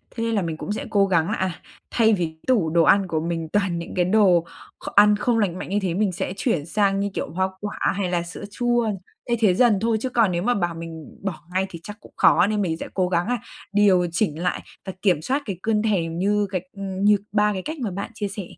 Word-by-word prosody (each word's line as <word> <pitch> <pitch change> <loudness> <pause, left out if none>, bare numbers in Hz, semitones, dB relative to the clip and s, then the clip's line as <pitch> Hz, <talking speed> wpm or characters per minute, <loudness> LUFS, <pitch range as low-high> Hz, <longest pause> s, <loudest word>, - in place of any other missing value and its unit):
Thế 230 - -2
là 205 -3 +1
mình 165 -2 -3
cũng 205 - -5
sẽ 270 +7 -3
cố 200 -2 +3
gắng 170 -3 +2
là, - - 0
à, 190 -1 -1 0.4
thay 225 -2 +4
vì 180 -4 +1
cái 160 0 -8
tủ 210 -11 +3
đồ 165 0 +3
ăn 195 +2 +4
của 160 -2 -1
mình 165 0 -3
toàn 200 -4 +1
những 170 - -7
cái 180 -1 +2
đồ 185 -4 +4 0.3
kh - - -11
ăn 210 +1 +7
không 225 +2 +1
lành 185 -4 0
mạnh - - -6
như 205 +1 +1
thế 180 -3 -1
mình 200 0 +1
sẽ 180 +1 -3
chuyển 170 - 0
sang, 195 +1 +1
như 200 0 0
kiểu, - - -3
hoa 190 +2 0
quả 205 0 -5 0.2
hay 195 -3 -1
là 175 -1 0
sữa 170 - -9
chua. 240 -1 +1 0.4
Thay 235 -1 +1
thế 195 -5 +5
dần 230 -1 +4
thôi 225 -1 +2
chứ 260 - -2
còn 230 -6 +3
nếu 175 +1 -1
mà 245 +2 +2
bảo 175 -5 -1
mình 165 -2 -9
bỏ 185 -6 -4
ngay 190 +1 +1
thì 170 - -9
chắc 210 0 -8
cũng - - -17
khó 190 - +5
nên 210 -1 0
mình 165 -4 -1
sẽ - - -6
cố 185 -2 +1
gắng 175 +2 0
á 245 0 0 0.4
điều 190 -4 +4
chỉnh 170 -4 0
lại 180 - -1 0.2
và 190 - -5
kiểm 180 -7 +2
soát 275 - -1
cái 195 -5 -4
cơn 220 -1 +1
thèm 170 -7 0
như 205 +1 +1
cái 185 -2 -1 0.2
ừm, 195 -1 -4
như 210 0 +6
3 210 0 +2
cái 190 - -3
cách 315 - -5
mà 220 -6 -2
bạn 200 +5 -5
chia 205 -2 -3
sẻ 200 0 -6
195 Hz, 265 wpm, -23 LUFS, 175-210 Hz, 0.4 s, ăn